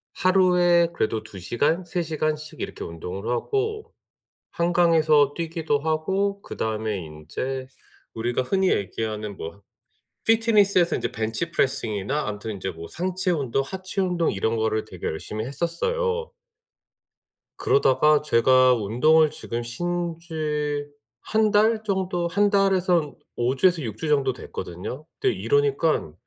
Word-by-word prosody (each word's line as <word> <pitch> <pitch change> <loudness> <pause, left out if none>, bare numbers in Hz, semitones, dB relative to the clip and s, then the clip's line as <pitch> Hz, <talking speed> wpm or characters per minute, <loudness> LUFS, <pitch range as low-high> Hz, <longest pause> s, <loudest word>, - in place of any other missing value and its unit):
하루에 180 -2 +4
그래도 110 -6 -1
2 100 -3 -10
시간, 150 - 0
3 175 +1 -2
시간씩 155 -1 -3
이렇게 - - -5
운동을 90 +6 -6
하고 425 - -2 0.6
한강에서 165 -4 +3
뛰기도 165 -3 -1
하고 190 +6 -1
그다음에 110 - -3
인제 130 - -5 0.5
우리가 120 +3 -1
흔히 190 +7 +1
얘기하는 105 +1 -2
뭐 95 +5 -8 0.6
피트니스에서 210 -6 +4
인제 - - -2
벤치 110 +10 -3
프레싱이나 130 - -1
아무튼 105 +1 -5
인제 95 -1 -4
뭐 85 -1 -9
상체 185 +1 -2
운동, 135 -5 0
하체 190 +2 -5
운동 180 -3 +1
이런 110 +3 -1
거를 110 -1 0
되게 90 -4 -9
열심히 105 +7 -4
했었어요. 460 - -2 1.3
그러다가 145 +2 +4
제가 130 -2 +5
운동을 145 +8 +3
지금 120 -7 -5
쉰 175 +7 -3
지 150 -3 -2 0.3
1 215 -1 +1
달 220 +2 +3
정도 190 -4 -1
1 205 +4 +2
달에서 190 -3 +3
한 150 -2 -9 0.2
5 120 +3 0
주에서 175 +2 +3
6 110 -3 -5
주 160 - -4
정도 135 -3 +2
됐거든요. 95 - -7
근데 - - +2
이러니깐 140 - +1
150 Hz, 280 characters per minute, -24 LUFS, 115-180 Hz, 1.3 s, 제가